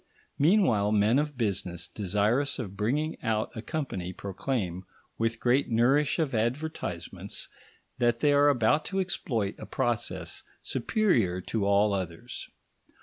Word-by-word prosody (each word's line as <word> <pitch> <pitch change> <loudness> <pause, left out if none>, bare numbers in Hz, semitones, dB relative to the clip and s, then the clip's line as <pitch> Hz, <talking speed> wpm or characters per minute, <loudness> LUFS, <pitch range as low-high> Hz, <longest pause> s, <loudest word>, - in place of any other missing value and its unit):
Meanwhile, 140 - +4
men 110 +5 +4
of 150 -2 -2
business 90 -6 -2
desirous 105 +8 +1
of 100 -6 -5
bringing 140 +10 -1
out 110 -1 -1
a 110 - -4
company 110 - -4
proclaim, 95 -2 -3 0.4
with 115 0 0
great 130 +3 +2
nourish 130 +6 +3
of 155 -6 0
advertisements, 115 - -3 0.5
that 120 -1 +3
they 145 +4 +3
are 145 +1 +6
about 140 +3 +3
to 195 - -2
exploit 115 - -1
a - - -8
process 100 -9 -2 0.2
superior 120 - +1
to 100 +1 -1
all 100 +1 +4
others. 90 -4 -5
115 Hz, 130 wpm, -28 LUFS, 100-140 Hz, 0.5 s, are